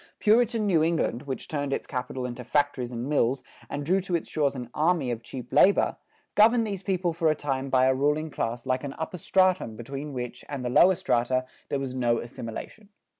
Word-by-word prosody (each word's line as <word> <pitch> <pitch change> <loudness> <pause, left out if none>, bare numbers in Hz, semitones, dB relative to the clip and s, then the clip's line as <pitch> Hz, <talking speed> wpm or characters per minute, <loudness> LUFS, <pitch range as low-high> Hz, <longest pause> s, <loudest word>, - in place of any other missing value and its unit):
Puritan 225 0 +3
New 175 -6 +3
England, 155 -5 0
which 130 - -4
turned 145 -2 -2
its - - -2
capital 130 -1 -4
into 125 0 -6
factories 135 -1 0
and 120 +1 -4
mills 135 -3 +1 0.3
and 145 0 -4
drew 185 +5 +2
to 185 -1 -1
its 170 - -2
shores 145 -3 0
an 120 -2 -7
army 155 -4 +1
of 115 -1 -4
cheap 125 +1 -9
labor, 190 +8 +5 0.4
governed 225 +2 +5
these 200 -3 -4
people 185 -3 0
for 165 -1 +2
a 155 - +2
time 135 -2 -2
by 130 -1 +4
a 130 - +4
ruling 150 +3 0
class 120 0 -3
like 130 0 0
an 140 -1 -5
upper 160 +3 -5
stratum 185 - +2
between 135 +6 -6
which 125 -2 -6
and 135 -3 -4
the 125 - -1
lower 185 +8 +6
strata 130 -2 +1 0.2
there 140 - 0
was 135 -2 -4
no 120 -2 +1
assimilation. 120 - -7
140 Hz, 205 wpm, -27 LUFS, 125-170 Hz, 0.4 s, lower